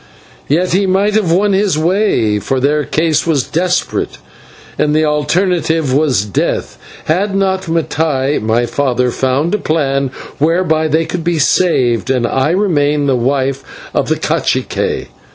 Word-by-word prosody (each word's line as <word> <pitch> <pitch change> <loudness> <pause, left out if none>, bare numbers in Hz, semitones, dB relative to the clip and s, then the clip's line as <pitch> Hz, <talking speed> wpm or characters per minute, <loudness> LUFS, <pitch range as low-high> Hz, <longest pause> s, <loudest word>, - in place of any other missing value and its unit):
Yet 170 +5 +1
he 195 +1 +2
might 195 +3 +1
have 205 -6 +1
won 200 +4 +2
his 195 -4 +1
way, 155 - +1
for 130 +6 -1
their 150 +3 +1
case 160 0 0
was 145 -6 +2
desperate, 180 +5 -1 0.6
and 150 0 +2
the 155 0 +3
alternative 160 -1 0
was 135 -8 +2
death 100 - -2 0.3
had 195 +5 0
not 190 -1 0
Mattai, 150 -4 0
my 115 +3 +1
father, 125 -1 0
found 135 +8 0
a 210 - +1
plan 140 -5 0 0.3
whereby 160 0 +1
they 160 +2 +1
could 175 0 -4
be 170 0 0
saved 130 -7 +1
and 125 -3 +1
I 130 +4 0
remain 150 -6 +1
the 135 -2 +2
wife 135 +2 -1 0.3
of - - 0
the - - +2
/cacique - - -1
155 Hz, 150 wpm, -14 LUFS, 135-180 Hz, 0.6 s, the